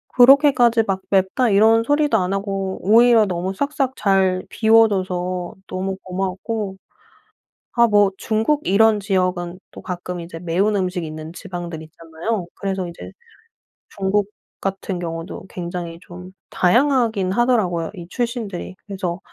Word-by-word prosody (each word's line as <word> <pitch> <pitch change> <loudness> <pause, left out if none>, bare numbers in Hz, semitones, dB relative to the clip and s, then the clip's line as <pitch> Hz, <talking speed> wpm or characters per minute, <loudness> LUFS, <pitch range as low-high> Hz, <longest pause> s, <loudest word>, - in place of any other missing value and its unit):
그렇게까지 250 -3 +6
막 195 -3 -2
"맵다." 195 +6 +2
이런 220 +3 +5
소리도 290 -1 +2
안 185 -1 -1
하고 195 -1 -3
오히려 230 +2 +5
너무 185 0 -3
싹싹 275 +2 -1
잘 190 -2 +1
비워 225 0 +5
줘서 185 -2 -3
너무 190 +1 -3
고마웠고 190 +2 -3 1.0
아 235 0 +6
뭐 205 -2 +4
중국 225 +9 0
이런 215 +2 +4
지역은 185 -2 -1
또 - - -11
가끔 180 -1 -5
이제 170 -1 -8
매운 180 +5 0
음식이 180 -3 -1
있는 155 +1 -8
지방들이 175 -4 -7
있잖아요. 165 +6 -5
그래서 190 -2 -3
이제 170 - -10 0.8
중국 200 +1 -1 0.3
같은 195 -1 -3
경우도 165 -1 -6
굉장히 170 -1 -6
좀 180 +1 -11 0.2
다양하기는 230 -2 +2
하더라고요 195 -8 +1
이 175 -2 -9
출신들이. 230 -7 -4
그래서 190 -3 -4
195 Hz, 300 characters per minute, -21 LUFS, 180-225 Hz, 1.0 s, 그렇게까지